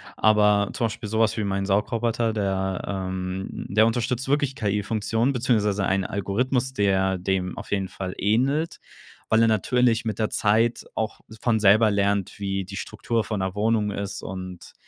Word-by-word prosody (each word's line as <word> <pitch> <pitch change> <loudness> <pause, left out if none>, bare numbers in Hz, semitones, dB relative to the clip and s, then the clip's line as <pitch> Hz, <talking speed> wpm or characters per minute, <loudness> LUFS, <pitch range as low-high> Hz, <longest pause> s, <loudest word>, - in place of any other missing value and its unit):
Aber 105 -1 +4
zum 115 - 0
Beispiel 110 -1 -4
so 110 +1 -1
was 110 -2 +2
wie 110 - 0
mein 100 -1 -1
Saugroboter, 115 +3 0
der, 95 -3 -1
ähm 95 -1 -3 0.2
der 110 +3 +4
unterstützt 120 +2 -1
wirklich 145 -2 +1
KI-Funktionen 110 +4 0
beziehungsweise 105 -5 +1
einen 95 -1 +1
Algorithmus, 125 +7 -1
der 95 -4 +1
dem 90 0 -2
auf - - -8
jeden 95 -2 0
Fall 95 -1 -6
ähnelt, 135 +10 +1 0.5
weil 110 0 +3
er 115 - +5
natürlich 115 +2 +2
mit 110 0 -3
der 110 - +1
Zeit 115 +3 +2
auch 110 0 -3 0.2
von 115 -2 +2
selber 110 +2 +5
lernt, 100 -1 0
wie 95 -1 -2
die 95 +2 -9
Struktur 115 +3 -2
von 105 0 -3
'ner 95 0 -2
Wohnung 105 0 +1
ist 100 -1 -4
und 95 -1 -8
105 Hz, 165 wpm, -24 LUFS, 95-115 Hz, 0.5 s, er